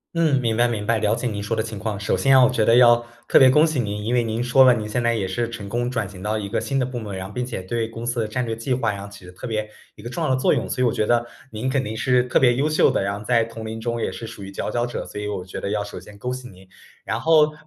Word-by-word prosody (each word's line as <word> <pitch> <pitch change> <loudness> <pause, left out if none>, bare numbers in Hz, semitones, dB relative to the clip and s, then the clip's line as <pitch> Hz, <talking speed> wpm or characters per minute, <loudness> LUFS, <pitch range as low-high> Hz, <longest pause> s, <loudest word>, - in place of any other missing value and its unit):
嗯， 155 -6 +2
明 115 -1 0
白 120 0 +4
明 105 -3 -3
白， 115 0 +1
了 105 +1 +1
解 125 - -5
您 105 -3 -2
说 105 +3 -2
的 110 - 0
情 110 -3 -6
况。 105 -2 -3
首 100 - -1
先 135 -1 +5
我 125 - +6
觉 115 -4 +1
得 115 - +5
要 120 -1 +7 0.3
特 - - +7
别 130 -1 +8
恭 150 +4 +5
喜 155 -5 -1
您， 105 -2 -3
因 120 +3 -1
为 120 - +3
您 115 +2 -2
说 130 +2 +5
了 125 - +7
您 110 -2 -3
现 120 +3 -1
在 115 0 +1
也 100 -4 -1
是 115 +5 -2
成 105 -4 -7
功 120 +1 -1
转 115 -6 -2
型 95 -2 -11
到 105 +2 -1
一 100 -2 -4
个 - - 0
新 135 - -2
的 130 - +1
部 125 -1 -5
门， 105 -3 -6
然 95 0 -5
后 105 - -10
并 125 0 -2
且 110 - -5
对 115 +4 -2
公 115 +1 -8
司 120 0 -1
的 110 - 0
战 125 +3 -2
略 115 - -3
计 115 +3 -2
划 115 -4 0
然 100 -1 -6
后 100 - -8
起 100 -2 -14
着 90 - -11
特 95 - -8
别 110 -1 -2 0.3
一 105 - -13
个 120 - -6
重 170 - -5
要 155 - 0
的 130 - +3
作 130 - +2
用。 - - -2
所 125 - -1
以 - - +4
我 115 - +3
觉 105 - 0
得 120 0 +2 0.3
您 115 +4 -3
肯 135 0 +1
定 110 -1 -5
是 125 +2 +2
特 125 - +2
别 120 -2 +5
优 145 +4 +1
秀 155 - +4
的， - - 0
然 100 +1 -2
后 105 - -9
在 115 0 +2
同 115 -1 -9
龄 110 +1 -5
中 115 0 -3
也 - - -1
是 115 - -7
属 100 - -9
于 95 - -8
佼 - - -4
佼 120 0 0
者， 120 - -5
所 105 - -7
以 105 - -4
我 95 -3 -4
觉 95 - -7
得 100 - -3
要 105 0 -1
首 105 - -7
先 105 -1 -12
恭 125 +2 -3
喜 125 -1 -8
您。 95 0 -17 0.4
然 - - -2
后 155 -2 +4
115 Hz, 370 characters per minute, -22 LUFS, 105-125 Hz, 0.4 s, 别